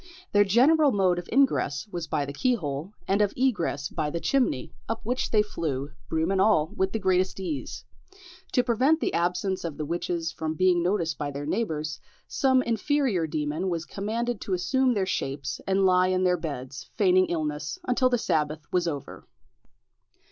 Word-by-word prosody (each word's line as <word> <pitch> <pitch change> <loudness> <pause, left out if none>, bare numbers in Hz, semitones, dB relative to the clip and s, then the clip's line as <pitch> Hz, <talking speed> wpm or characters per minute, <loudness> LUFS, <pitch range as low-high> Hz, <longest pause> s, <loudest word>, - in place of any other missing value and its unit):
Their 205 0 +5
general 275 +9 +4
mode 185 -4 +2
of 175 - -9
ingress 225 - +2
was 170 -2 -4
by 150 -2 -1
the 140 - -6
keyhole, 165 - -1 0.2
and 200 +2 +2
of 205 -1 +2
egress 190 - 0
by 155 -3 -2
the 170 - -3
chimney, 245 - 0 0.2
up 225 0 -2
which 250 +3 -1
they 215 -2 +4
flew, 145 -8 -3 0.2
broom 160 +3 0
and 190 -1 +2
all, 190 -7 +3
with 190 0 0
the 225 - -1
greatest 185 -2 +1
ease. 165 -7 -5 0.7
To 250 - +4
prevent 260 +7 +2
the - - -1
absence 180 +2 0
of 165 -4 -5
the 150 - -3
witches 170 +1 -2
from 160 0 -4
being 180 +1 +3
noticed 170 -4 0
by 145 - -2
their 145 +1 -5
neighbours, 155 - -2 0.3
some 260 -1 +2
inferior 230 - 0
demon 155 +4 -2
was 170 -2 -2
commanded 225 +3 -3
to 190 - -1
assume 255 +7 +1
their 195 -2 +1
shapes 140 -6 -3
and 195 0 +2
lie 185 0 +4
in 185 0 +1
their 180 -1 +3
beds, 135 -6 -6
feigning 185 -3 +4
illness, 155 - -3
until 255 +1 +3
the 245 - +2
sabbath 155 -6 -1
was 180 -1 +1
over. 145 -4 -6
185 Hz, 175 wpm, -26 LUFS, 155-220 Hz, 0.7 s, Their